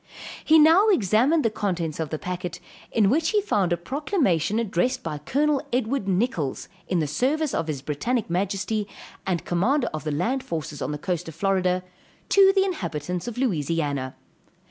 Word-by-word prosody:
He 315 - +6
now 325 +7 +6
examined 265 - +3
the 225 - +2
contents 175 -7 -2
of 160 -2 -2
the 155 - -3
packet, 180 +1 -5 0.3
in 215 -4 +3
which 315 +9 +2
he 425 - +3
found 205 - 0
a 175 - +2
proclamation 215 - 0
addressed 230 +4 0
by 150 -7 -4
Col. 285 - +1
Edward 245 -2 -1
Nichalls, 185 - -1 0.2
in 185 - 0
the 160 - +1
service 270 - 0
of 165 - -1
his 140 -4 -4
Brittanic 215 - -1
Majesty, 195 +4 -1 0.4
and 180 -3 -1
commander 240 +10 +1
of 155 - -4
the 155 - -2
land 230 - 0
forces 155 -3 -5
on - - -2
the 150 - -3
coast 175 +1 -3
of 160 - -8
Florida, 185 0 +1 0.5
to 390 -1 +6
the 390 -1 +3
inhabitants 180 - -3
of 240 - -5
Louisiana. 150 - -1
195 Hz, 170 wpm, -25 LUFS, 165-260 Hz, 0.5 s, He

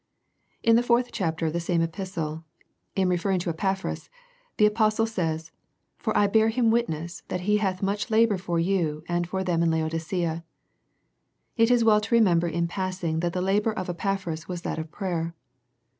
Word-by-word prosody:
In 230 0 +5
the - - +4
fourth 245 0 +2
chapter 165 -5 -1
of 155 - -1
the 170 - 0
same 170 0 +1
epistle, 165 -3 -4 0.5
in 190 -1 +2
referring 180 +2 +1
to 170 - -1
Epaphras, 190 +3 -2 0.5
the 210 - +5
apostle 215 +1 +2
says, 160 -7 -3 0.3
" - - -50
For - - -1
I 205 - +5
bear 220 +2 +3
him 230 0 +2
witness, 170 -8 -1
that 180 - -3
he 210 +3 +2
hath 190 -2 -1
much 205 +4 -1
labour 220 -3 +3
for 175 -2 -2
you, 165 -4 0
and 175 0 -1
for 190 0 -1
them 175 -3 +1
in 170 - +3
Laodicea." 165 +1 -1 1.1
It 230 0 +4
is 245 -1 +4
well 215 -2 +5
to 235 - 0
remember 175 -7 +4
in 170 +1 0
passing 180 -3 -2
that 170 0 -1
the 180 - -1
labour 205 +3 +1
of 185 -3 -3
Epaphras 175 -3 -3
was 175 -1 -5
that - - -3
of 160 0 -5
prayer. 170 -4 -3
185 Hz, 185 wpm, -26 LUFS, 165-210 Hz, 1.1 s, In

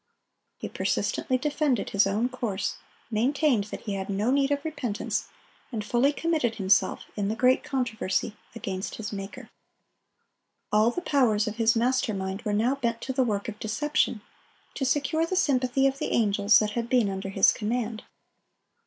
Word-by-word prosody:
He - - -5
persistently 255 - -1
defended 290 -4 0
his 200 0 +4
own 210 +5 +1
course, 230 -6 -3 0.3
maintained 250 0 +2
that 210 - -7
he 205 - -4
had 195 0 -4
no 205 +5 0
need 275 0 +2
of 285 +1 -1
repentance, 250 -9 -3 0.4
and 215 -4 -4
fully 245 +6 +3
committed 295 -7 0
himself, 195 -1 +2
in 205 -2 -1
the 215 - -1
great 255 +2 +3
controversy, 220 -6 -1 0.2
against 195 -4 -4
his 210 -1 -6
Maker. 195 0 -7 1.2
All 215 +2 +4
the 355 +9 -4
powers 230 -8 +2
of 215 +1 -4
his 225 0 +3
master 245 -1 +1
mind 190 +1 -4
were 210 - -2
now 225 +5 +2
bent 235 -4 -2
to 265 - -3
the 260 - +1
work 210 -5 0
of 215 -2 -6
deception, 240 0 0 0.5
to 270 - -2
secure 295 +4 +1
the 370 - -2
sympathy 270 -7 +2
of 275 0 +1
the - - -2
angels 205 -2 +4
that 210 -1 +1
had 235 +2 -3
been 245 -4 +3
under 195 0 -4
his 195 0 +5
command. 225 0 -2
230 Hz, 170 wpm, -27 LUFS, 210-265 Hz, 1.2 s, his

